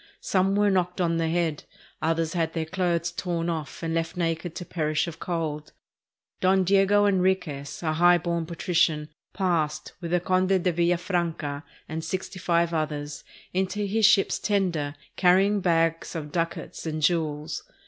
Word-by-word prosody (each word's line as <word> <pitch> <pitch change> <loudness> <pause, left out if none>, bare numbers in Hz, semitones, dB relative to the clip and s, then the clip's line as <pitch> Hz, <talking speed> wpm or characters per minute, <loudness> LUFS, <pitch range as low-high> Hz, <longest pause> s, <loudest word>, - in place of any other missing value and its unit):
Some 190 +1 +1
were 205 0 +3
knocked 180 -1 0
on 170 -2 +1
the 165 -1 0
head, 165 -3 0 0.4
others 165 0 0
had 165 -2 -1
their 160 -1 -2
clothes 175 -1 0
torn 170 -1 -2
off 160 -1 -5
and 165 0 -1
were - - +1
left 165 +2 -5
naked 165 0 -2
to 180 - -5
perish 155 -3 0
of 165 -1 -7
cold. 155 -4 -3 0.7
Don 190 +1 +3
Diego 200 +2 +4
Enriquez, 180 -8 0
a 155 -1 +1
high 175 +2 +5
born 170 -1 -2
patrician, 165 -3 +1 0.2
passed, 160 -5 -1
with 170 - -4
the 180 +1 +2
Conde 185 +1 +1
de 180 - +3
Villafranca 170 -4 0 0.3
and 160 +1 -4
sixty 185 +3 -4
five 170 -1 +1
others, 150 -2 -3 0.3
into 190 +3 -1
his 210 +1 +4
ship's 195 -2 +3
tender, 175 -8 0 0.2
carrying 195 +3 +4
bags 165 -1 +1
of 150 -2 -5
ducats 165 0 -3
and 155 -1 -3
jewels. 155 -3 0
170 Hz, 160 wpm, -26 LUFS, 160-185 Hz, 0.7 s, high